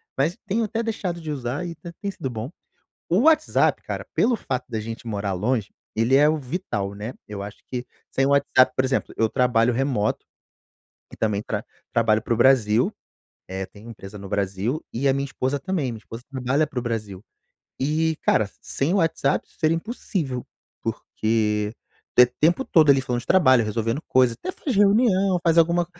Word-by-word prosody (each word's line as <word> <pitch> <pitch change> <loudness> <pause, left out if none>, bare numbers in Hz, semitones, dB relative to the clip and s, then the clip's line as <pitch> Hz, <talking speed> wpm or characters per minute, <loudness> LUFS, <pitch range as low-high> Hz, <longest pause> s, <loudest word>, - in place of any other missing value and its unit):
mas 160 +9 0
tenho 215 +3 0
até 225 +2 -2
deixado 195 -6 -3
de 155 -2 -5
usar 135 +4 -3
e 170 - -4
até 170 +1 -9
tem 200 -1 -3
sido 135 -8 -5
bom. 120 +5 -5 0.6
O 185 +7 +3
WhatsApp 310 +1 +3
cara, - - -5
pelo 240 -1 +3
fato 130 - -3
da 110 -3 -3
gente 115 +2 -6
morar 100 -2 -2
longe, 110 +3 -1 0.3
ele 115 +4 +2
é 145 +2 +6
o 155 - +2
vital, 130 - -3
né, 105 +5 -5
eu 100 -1 -6
acho 100 +1 -8
que 125 -1 -4 0.3
sem 135 - +1
o - - +2
WhatsApp 140 -2 +4
por 130 - +2
exemplo, 135 +1 -1
eu 110 - +2
trabalho 125 -1 +2
remoto, 120 -4 0 0.9
que - - -12
também 105 -2 0
tra 110 -1 -3 0.3
trabalho 110 -2 +3
para 115 - 0
o - - -2
Brasil, 120 -2 +4 0.6
eh, 95 +1 -4
tenho 105 +4 -14
empresa 105 -2 -10
no 100 -1 -9
Brasil, 100 - -1
e 135 +4 0
a 135 - +4
minha 140 +1 -1
esposa 140 +1 -2
também, 165 -7 -2
minha 115 - -7
esposa 115 +2 -10
trabalha 135 +3 0
para 145 -2 -11
o - - -4
Brasil. 110 -5 -4 0.6
E 155 +3 +1
cara, 105 -2 +2
sem 140 +5 -1
o 200 - +2
WhatsApp 165 -2 +1
isso - - -24
seria 160 0 +2
impossível, 165 - -3 0.4
porque 105 -1 -1 0.4
te 125 - +8
tempo 170 - +4
todo 155 -5 +5
ali 135 - +5
falando 125 -2 -2
de - - -17
trabalho, 130 -10 +5
resolvendo 115 +7 -1
coisa, 125 -2 +3
até - - -5
faz 270 -7 -3
reunião, 200 -2 +4
faz 165 -2 +3
alguma, 170 +1 +4
130 Hz, 190 wpm, -24 LUFS, 110-165 Hz, 0.9 s, te